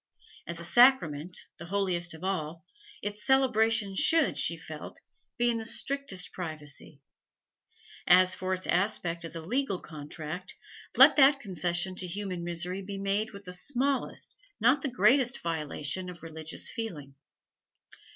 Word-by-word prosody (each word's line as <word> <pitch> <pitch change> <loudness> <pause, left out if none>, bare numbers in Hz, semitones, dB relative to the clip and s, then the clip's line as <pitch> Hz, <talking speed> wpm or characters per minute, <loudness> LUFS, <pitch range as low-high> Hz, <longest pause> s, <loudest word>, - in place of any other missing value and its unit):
As 170 0 -5
a 170 - -6
sacrament, 180 - +4 0.2
the 170 - -8
holiest 180 -3 -1
of 160 - -13
all, 170 -2 -3 0.4
its 205 +1 -5
celebration 225 -6 +2
should, 330 - +3
she - - 0
felt, - - -9 0.4
be 240 0 +2
in 235 -1 +1
the 225 - -4
strictest 245 -7 -1
privacy; 155 -4 -6 1.1
as 185 +1 +6
for 185 0 -4
its 185 0 -2
aspect 175 -2 0
as 165 0 -8
a 165 - -5
legal 215 +1 -1
contract, 155 +3 -8 0.4
let - - +8
that 275 0 +6
concession 180 - -1
to 185 - -2
human 185 -1 -4
misery 175 +2 -3
be 195 +1 -6
made 200 +2 -1
with 200 -1 -11
the 180 -2 -7
smallest, 265 +7 -1 0.3
not 265 +5 +4
the 275 - 0
greatest, 255 +1 +3
violation 160 +2 -2
of 175 -1 -11
religious 160 -1 -3
feeling. 160 - -6
185 Hz, 140 wpm, -29 LUFS, 170-225 Hz, 1.1 s, let